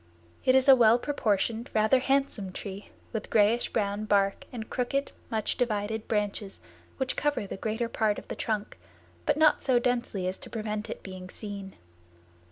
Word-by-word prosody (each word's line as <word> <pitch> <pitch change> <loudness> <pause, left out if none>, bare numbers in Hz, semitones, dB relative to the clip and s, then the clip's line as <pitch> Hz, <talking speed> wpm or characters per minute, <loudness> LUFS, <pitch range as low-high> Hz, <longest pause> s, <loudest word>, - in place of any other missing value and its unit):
It 255 - +5
is 265 +1 +4
a 270 - +10
well 230 -2 +6
proportioned, 230 -3 0
rather 220 +4 +4
handsome 270 -8 0
tree 200 0 -7 0.2
with 220 -2 -4
grayish 220 +2 +3
brown 205 +1 -1
bark 200 -2 +2
and 225 -3 -6
crooked, 275 +3 -1 0.2
much 220 -3 -1
divided 220 -2 -1
branches 205 -2 -2 0.4
which 265 -1 -1
cover 295 -7 0
the - - -6
greater 225 +4 -2
part 220 -2 +1
of - - -9
the - - -5
trunk, 215 - -3 0.5
but - - +3
not 310 -1 +5
so 255 -2 +3
densely 240 -6 0
as 185 - -3
to - - -9
prevent 215 -1 -3
it - - -6
being 185 -1 -8
seen. 200 -1 -6
220 Hz, 170 wpm, -28 LUFS, 205-245 Hz, 0.5 s, a